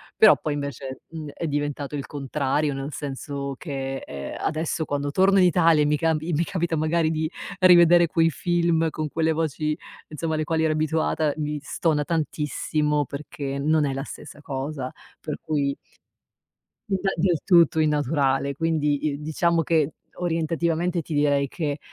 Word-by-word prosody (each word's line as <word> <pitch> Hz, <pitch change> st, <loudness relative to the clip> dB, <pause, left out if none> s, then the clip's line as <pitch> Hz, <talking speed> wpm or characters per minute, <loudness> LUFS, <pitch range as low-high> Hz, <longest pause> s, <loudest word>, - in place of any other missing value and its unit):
Però 215 Hz, -, +7 dB
poi 150 Hz, -, -1 dB
invece, 140 Hz, -2 st, -5 dB
mhmm, 155 Hz, -3 st, -7 dB
è 165 Hz, -, -4 dB
diventato 145 Hz, 0 st, -2 dB
il 140 Hz, -, -4 dB
contrario 145 Hz, 0 st, -1 dB
nel 135 Hz, +2 st, -5 dB
senso 140 Hz, -1 st, -5 dB
che, 135 Hz, -3 st, -4 dB
ehm, 70 Hz, -1 st, -6 dB
adesso 160 Hz, 0 st, -1 dB
quando 145 Hz, 0 st, -2 dB
torno 195 Hz, +3 st, +4 dB
in 180 Hz, -, +6 dB
Italia 165 Hz, -3 st, +4 dB
e -, -, +1 dB
mi 150 Hz, 0 st, +2 dB
camb 160 Hz, -1 st, +1 dB
i 170 Hz, +2 st, -3 dB
mi 165 Hz, +2 st, +1 dB
capita 170 Hz, -4 st, -1 dB
magari 160 Hz, +1 st, +1 dB
di 155 Hz, 0 st, -1 dB, 0.3 s
rivedere 175 Hz, -2 st, +7 dB
quei 165 Hz, 0 st, +3 dB
film 170 Hz, 0 st, +1 dB
con 155 Hz, -1 st, -4 dB
quelle 160 Hz, +1 st, +1 dB
voci, 155 Hz, -1 st, -1 dB, 0.3 s
insomma, 160 Hz, +1 st, -3 dB
alle 155 Hz, 0 st, -1 dB
quali 160 Hz, 0 st, 0 dB
ero 160 Hz, -, +2 dB
abituata, 155 Hz, -1 st, 0 dB
mi 150 Hz, -1 st, -2 dB
stona 165 Hz, -, -3 dB, 0.2 s
tantissimo 150 Hz, -1 st, -1 dB
perché 140 Hz, -1 st, -5 dB
non 155 Hz, +1 st, +2 dB
è 135 Hz, -, -1 dB
la 135 Hz, 0 st, -3 dB
stessa 145 Hz, -, -10 dB
cosa. 135 Hz, -1 st, -4 dB, 0.3 s
Per 150 Hz, -2 st, -5 dB
cui 140 Hz, -3 st, -1 dB, 1.1 s
Inda 195 Hz, -1 st, 0 dB
del 170 Hz, -1 st, +1 dB
tutto 170 Hz, -4 st, +5 dB
innaturale. 140 Hz, -2 st, +1 dB
Quindi, 155 Hz, -2 st, 0 dB
i 145 Hz, -, -7 dB
diciamo 165 Hz, +2 st, +1 dB
che 155 Hz, -2 st, +1 dB, 0.3 s
orientativamente 170 Hz, +1 st, 0 dB
ti 155 Hz, -, -7 dB
direi 145 Hz, -1 st, +2 dB
che, 145 Hz, -1 st, -3 dB
155 Hz, 160 wpm, -24 LUFS, 145-165 Hz, 1.1 s, Però